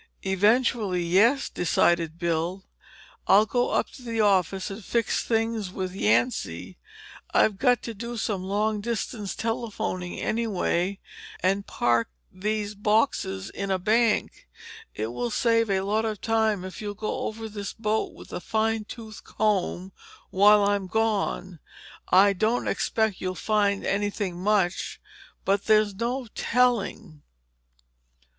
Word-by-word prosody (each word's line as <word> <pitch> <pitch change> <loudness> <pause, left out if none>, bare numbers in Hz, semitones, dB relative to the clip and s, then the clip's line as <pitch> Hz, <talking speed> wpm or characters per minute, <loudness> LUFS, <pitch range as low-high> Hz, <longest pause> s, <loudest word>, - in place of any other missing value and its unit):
"Eventually, 205 -1 +2
yes," 215 +11 +3
decided 170 -2 +1
Bill. 170 +2 -2 0.6
"I'll 205 +2 +6
go 245 +2 0
up - - 0
to - - -13
the 230 -2 -4
office 195 -2 +2
and 200 +2 -8
fix 230 +1 0
things 225 -4 -1
with 185 -1 -4
Yancy. 105 - 0 0.6
I've 205 -3 +3
got 250 -3 +3
to 230 - -5
do 235 +3 -6
some 205 -4 -2
long 210 +2 0
distance 220 -2 -3
telephoning, 225 -6 -3
anyway, 200 -4 -1 0.4
and 195 +2 +1
park 120 -1 +1 0.2
these 210 +2 -2
boxes 205 -2 0
in 200 0 -4
a 190 - +2
bank. 220 +4 +1 0.5
It 110 +2 -3
will 120 0 -2
save 230 - +2
a 190 -1 +1
lot 210 +3 0
of 215 -2 -3
time 220 -4 +1
if 185 - -8
you'll 205 -1 -4
go 215 +1 -3
over 225 +1 -6
this 205 -2 -6
boat 220 -1 -1
with - - -13
a - - -3
fine 220 +2 0
tooth 220 -2 -10
comb 195 -3 -1 0.4
while 205 +2 +6
I'm 200 -1 0
gone. 200 -4 -1 0.5
I 200 +2 +6
don't 220 +5 0
expect 220 -4 0
you'll 185 0 -2
find 205 0 +1
anything 200 -3 -2
much, 195 -2 0 0.5
but 195 +1 +1
there's 215 -1 +4
no 240 +5 -2
telling." 225 -9 0
205 Hz, 135 wpm, -26 LUFS, 185-220 Hz, 0.6 s, I'll